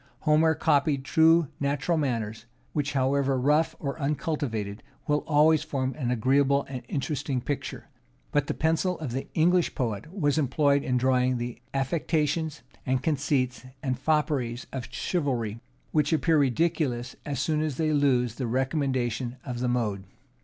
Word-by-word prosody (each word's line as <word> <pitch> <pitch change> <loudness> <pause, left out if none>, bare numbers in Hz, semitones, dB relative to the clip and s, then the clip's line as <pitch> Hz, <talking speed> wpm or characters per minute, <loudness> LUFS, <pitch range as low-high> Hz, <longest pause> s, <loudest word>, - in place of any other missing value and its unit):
Homer 160 +1 +4
copied 145 -3 +2
true 160 -1 +4
natural 140 +4 0
manners, 115 -6 -2 0.3
which, 145 -2 -1
however 135 0 +1
rough 150 +5 +2
or 140 +1 -4
uncultivated, 135 -8 -2 0.3
will 150 0 +3
always 155 0 +5
form 135 -4 -2
an 130 -6 -3
agreeable 135 +3 +2
and 130 -2 -5
interesting 140 -1 -2
picture; 140 +3 -4 0.4
but 145 -1 +1
the - - -2
pencil 165 +3 +1
of 150 -6 -5
the 130 +3 -3
English 175 +2 +3
poet 115 +1 -3
was 155 -6 +1
employed 140 0 +2
in 125 -2 0
drawing 125 0 +2
the 120 0 -5
affectations, 155 +1 -1 0.2
and 130 0 0
conceits, 140 -4 0 0.2
and 130 -3 -1
fopperies 140 -6 0
of 130 -2 -5
chivalry, 125 - -1 0.3
which 150 -1 +2
appear 160 0 +3
ridiculous 135 -3 0
as 140 -4 -3
soon 155 +1 +1
as 155 -4 -2
they 155 -1 +1
lose 130 -5 +2
the 125 0 -3
recommendation 130 -1 -1
of 125 -3 -4
the 125 - 0
mode. 105 -6 -1
140 Hz, 145 wpm, -27 LUFS, 125-155 Hz, 0.4 s, always